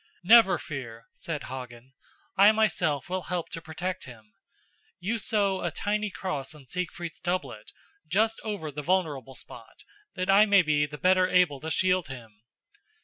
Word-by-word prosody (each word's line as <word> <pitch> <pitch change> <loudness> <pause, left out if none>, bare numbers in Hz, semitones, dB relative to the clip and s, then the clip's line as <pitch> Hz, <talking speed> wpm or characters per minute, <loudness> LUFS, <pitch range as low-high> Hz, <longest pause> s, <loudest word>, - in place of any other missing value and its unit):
"Never 220 0 +7
fear," 115 -6 -7
said 155 -4 -5
Hagen, 125 -1 -9 0.4
"I 200 +2 +7
myself 175 -10 +1
will 185 +1 -2
help 180 -2 -2
to 165 - -6
protect 180 +4 -5
him. 110 -4 -14 0.7
You 220 +6 -2
sew 200 -4 0
a 175 - 0
tiny 210 +4 -2
cross 155 -8 -5
on 145 -3 -15
Siegfried's 175 +1 -5
doublet, 175 - -3 0.4
just 220 +7 +1
over 200 -8 -4
the 150 +1 -5
vulnerable 145 -6 -1
spot, - - -12 0.3
that 185 -1 -2
I 200 +2 +6
may 200 -2 +6
be 150 -2 +2
the 150 +1 -9
better 185 +3 +3
able 180 -7 +3
to 160 - -5
shield 185 +1 +1
him." 115 -6 -11
175 Hz, 155 wpm, -27 LUFS, 140-190 Hz, 0.7 s, Never